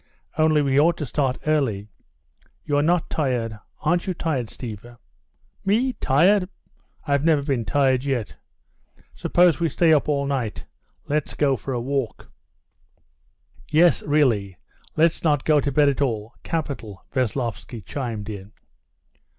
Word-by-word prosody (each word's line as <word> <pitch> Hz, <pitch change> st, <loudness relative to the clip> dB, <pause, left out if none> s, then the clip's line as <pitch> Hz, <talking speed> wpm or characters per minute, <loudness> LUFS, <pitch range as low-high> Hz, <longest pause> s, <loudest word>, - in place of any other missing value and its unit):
Only 155 Hz, -1 st, +3 dB
we 135 Hz, 0 st, +2 dB
ought 170 Hz, +3 st, +3 dB
to 150 Hz, -, -3 dB
start 135 Hz, -1 st, -1 dB
early. 130 Hz, -10 st, 0 dB, 0.8 s
You're 145 Hz, -1 st, +1 dB
not 170 Hz, +2 st, +2 dB
tired? 120 Hz, -7 st, -1 dB, 0.2 s
Aren't 175 Hz, +1 st, +1 dB
you 185 Hz, -, -1 dB
tired, 140 Hz, -8 st, -2 dB
Stiva?" 120 Hz, +1 st, -9 dB, 0.7 s
"Me 235 Hz, +6 st, +2 dB
tired? 180 Hz, -, +3 dB, 0.6 s
I've 140 Hz, -2 st, +1 dB
never 155 Hz, -3 st, +3 dB
been 135 Hz, -6 st, -1 dB
tired 130 Hz, 0 st, +2 dB
yet. 130 Hz, -7 st, -2 dB, 0.8 s
Suppose 175 Hz, -2 st, +3 dB
we 165 Hz, -1 st, +1 dB
stay 160 Hz, +2 st, +3 dB
up 150 Hz, -1 st, +2 dB
all 140 Hz, -1 st, +1 dB
night. 130 Hz, -6 st, -3 dB, 0.4 s
Let's 150 Hz, 0 st, -2 dB
go 140 Hz, -2 st, +2 dB
for 130 Hz, +4 st, -6 dB
a 125 Hz, -, -1 dB
walk!" 135 Hz, -1 st, -3 dB, 1.4 s
"Yes, 165 Hz, +1 st, +4 dB
really, 115 Hz, -, +1 dB, 0.4 s
let's 165 Hz, +1 st, +2 dB
not 150 Hz, -4 st, +2 dB
go 155 Hz, -1 st, +4 dB
to 140 Hz, -, -1 dB
bed 145 Hz, +2 st, +4 dB
at 140 Hz, 0 st, +1 dB
all! 115 Hz, -5 st, -1 dB
Capital!" 135 Hz, -, -5 dB
Veslovsky 120 Hz, -4 st, -3 dB
chimed 115 Hz, -7 st, -4 dB
in. 100 Hz, -1 st, -8 dB
140 Hz, 135 wpm, -23 LUFS, 120-155 Hz, 1.4 s, Yes